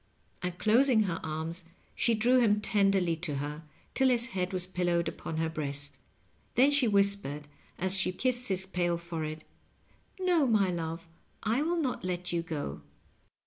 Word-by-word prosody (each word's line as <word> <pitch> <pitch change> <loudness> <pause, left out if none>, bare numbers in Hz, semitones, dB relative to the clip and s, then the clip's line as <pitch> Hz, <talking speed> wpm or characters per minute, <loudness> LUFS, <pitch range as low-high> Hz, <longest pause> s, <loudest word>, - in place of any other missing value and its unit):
And 180 0 -4
closing 230 +2 +4
her 175 -4 -2
arms 160 +3 -3 0.3
she 235 - +2
drew 245 +4 +4
him 210 -3 +3
tenderly 195 -5 +2
to 155 -3 -3
her, 145 +2 -4 0.3
till 265 -1 +3
his 245 0 +3
head 185 -4 -2
was 185 -2 0
pillowed 175 -2 0
upon 160 0 -5
her 160 0 0
breast. 145 -3 -3 0.6
Then 270 +4 +5
she 285 -4 +4
whispered, 200 -8 +1 0.3
as 190 +2 +1
she 190 - +2
kissed 250 +5 -1
his 190 -1 +1
pale 175 -2 0
forehead, 160 -2 -5 0.8
"No, 350 -6 +3
my 205 -5 +3
love, 165 -1 -4 0.4
I 225 +5 +1
will 340 +3 0
not 275 -7 -2
let 180 -1 -2
you 170 - +1
go." 150 - -5
180 Hz, 160 wpm, -30 LUFS, 165-225 Hz, 0.8 s, Then